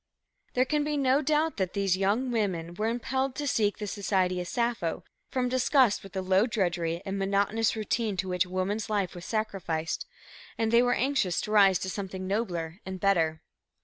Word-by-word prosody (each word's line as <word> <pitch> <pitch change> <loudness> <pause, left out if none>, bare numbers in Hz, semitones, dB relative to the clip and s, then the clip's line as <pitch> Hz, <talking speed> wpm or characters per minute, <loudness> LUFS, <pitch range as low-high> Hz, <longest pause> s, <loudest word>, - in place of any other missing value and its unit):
"There 255 +1 +4
can 300 +2 0
be 300 0 -1
no 270 +1 +3
doubt 310 +2 +1
that 190 -3 -1
these 195 -2 +1
young 205 +7 +1
women 185 -7 -1
were 215 +5 -1
impelled 260 +3 -1
to 295 - -3
seek 210 -6 +1
the 210 - -4
society 190 -3 0
of 180 - -6
Sappho 235 -7 -1 0.3
from 255 -1 0
disgust 255 -2 +3
with 195 0 -12
the 190 -1 -2
low 190 +4 +3
drudgery 175 -6 -1
and 195 0 -3
monotonous 200 +3 +1
routine 215 -1 -1
to 185 +1 -1
which 180 0 +1
woman's 190 +4 -2
life 200 -4 0
was 175 0 -9
sacrificed, 185 -7 -2 0.5
and 225 -1 0
they 235 +1 +6
were 245 0 +2
anxious 250 -10 +1
to 210 - -5
rise 195 -3 +6
to 190 - -4
something 190 -1 -5
nobler 180 -4 -2
and 190 0 -6
better." 165 -5 +1
200 Hz, 185 wpm, -28 LUFS, 185-235 Hz, 0.5 s, they